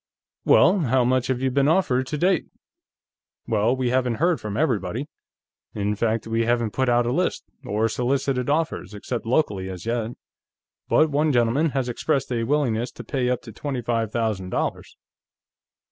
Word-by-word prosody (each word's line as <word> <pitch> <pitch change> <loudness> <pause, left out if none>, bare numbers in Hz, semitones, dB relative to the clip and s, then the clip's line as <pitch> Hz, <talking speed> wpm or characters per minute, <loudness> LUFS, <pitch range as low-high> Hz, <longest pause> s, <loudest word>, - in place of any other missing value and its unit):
"Well, 185 +5 +5
how 130 -5 +2
much 130 0 +1
have 130 -1 -1
you 130 0 +1
been 140 +1 +2
offered, 135 -7 +2
to 150 - -3
date?" 180 +2 +2 1.0
"Well, 115 +2 +2
we 130 -2 -1
haven't 125 -2 +1
heard 170 +5 +1
from 105 0 -4
everybody. 120 - 0 0.7
In 105 0 0
fact, 110 +1 0
we 115 0 0
haven't 120 -2 0
put 130 -1 +1
out 120 0 +3
a 120 - 0
list, - - 0 0.2
or 105 +2 0
solicited 125 +2 -1
offers, 155 -7 -1
except 115 +2 -5
locally, 105 -8 0
as 90 -2 -7
yet. 115 0 -2 0.8
But 155 -1 +4
one 150 +2 +2
gentleman 125 +5 +2
has 130 -2 0
expressed 135 +2 -1
a 115 -2 0
willingness 125 -4 0
to - - -9
pay 130 -3 -1
up 125 - -1
to 115 - -10
twenty 130 +2 -4
five 115 -2 -1
thousand 110 -6 -1
dollars." - - -3
125 Hz, 170 wpm, -24 LUFS, 115-140 Hz, 1.0 s, Well